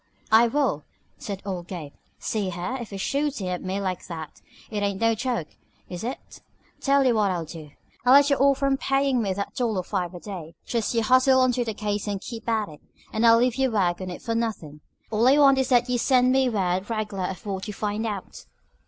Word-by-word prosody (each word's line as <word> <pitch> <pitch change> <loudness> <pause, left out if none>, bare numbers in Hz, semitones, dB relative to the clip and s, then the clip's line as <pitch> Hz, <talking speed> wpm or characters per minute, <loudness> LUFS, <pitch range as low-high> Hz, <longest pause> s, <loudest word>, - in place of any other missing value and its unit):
"I 225 +2 +7
will!" 235 - 0 0.4
said 200 -2 -6
old 180 -3 -4
Gabe. 160 -6 -7 0.2
"See 205 -4 -2
here, 180 +8 -4
if 235 - -7
he's 195 -1 -6
shootin' 280 -6 -1
at 180 -1 -3
me 190 +1 -2
like 185 -2 -3
that, 160 -3 -8 0.3
it 210 -1 -2
ain't 200 -1 -1
no 230 0 +3
joke, 235 -7 -2 0.4
is 180 +1 -6
it? 250 +3 -7 0.4
Tell 275 -1 +3
you 250 - +4
what 210 -3 +2
I'll 175 -3 -2
do. 155 -1 -10 0.3
I'll 250 +1 +6
let 285 +1 +6
you - - +5
off 275 0 +4
from 275 -1 +1
payin' 270 -2 +1
me 200 -3 -1
that 200 +1 -4
dollar 220 -7 -1
five 180 -2 -3
a - - -7
day. 175 -5 -8
Just 235 0 -1
you 230 - +2
hustle 255 +3 +5
onto 250 -1 +2
this 220 -3 -4
case 210 0 -2
and 200 -1 -2
keep 230 +2 -7
at 220 -2 +1
it, 150 - -13 0.3
and 220 +2 +3
I'll 230 0 +7
leave 245 +1 +2
you 265 -1 +2
work 190 -5 0
on 185 - -4
it 180 - -8
for 230 - -2
nothin'. 205 -11 -3 0.3
All 225 +3 +3
I 275 +3 +6
want 275 -2 +6
is 265 0 0
that 245 -1 +4
you 250 -1 0
should - - -1
send 255 -1 +4
me 265 -1 +3
word 190 -2 -1
reg'lar 210 -4 -2
of 190 +1 -8
what 195 0 -4
you 210 - -5
find 210 +2 -2
out." 205 -3 -6
215 Hz, 230 wpm, -25 LUFS, 190-250 Hz, 0.4 s, I